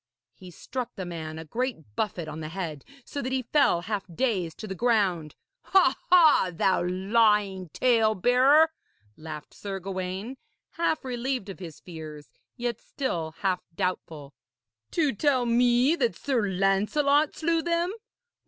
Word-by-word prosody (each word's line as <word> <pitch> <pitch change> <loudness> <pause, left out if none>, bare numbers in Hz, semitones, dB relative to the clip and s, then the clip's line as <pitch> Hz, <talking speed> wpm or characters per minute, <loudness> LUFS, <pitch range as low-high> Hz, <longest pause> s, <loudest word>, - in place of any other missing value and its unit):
He 185 - -13
struck 245 +8 -6
the 185 - -5
man 160 -2 -6
a 160 - -7
great 160 - -4
buffet 180 -6 -2
on 155 +1 -6
the 155 -1 -5
head, 160 -5 -5 0.2
so 285 - -5
that 255 - -3
he 260 -1 0
fell 245 - +3
half 205 +1 -3
dazed 185 -5 -1
to 215 - -7
the 190 - -4
ground. 190 -8 +1 0.3
'Ha! 365 -8 +4
ha! 320 - +6
thou 185 +2 +1
lying 195 0 +2
talebearer!' 250 - +4 0.4
laughed 155 -1 -9
Sir 195 -1 -5
Gawaine, 190 +6 -5 0.3
half 330 -4 -1
relieved 250 -3 -3
of 195 - -8
his 165 -5 -9
fears, 155 -6 -10 0.3
yet 240 -2 -2
still 165 - -3
half 185 -2 +1
doubtful. 165 -6 -3 0.6
'To 300 -6 +1
tell 260 +2 +2
me 245 +5 +3
that 470 +6 0
Sir 240 -7 0
Lancelot 210 +11 +2
slew 330 0 +1
them! 340 +2 0
205 Hz, 145 wpm, -27 LUFS, 175-260 Hz, 0.6 s, ha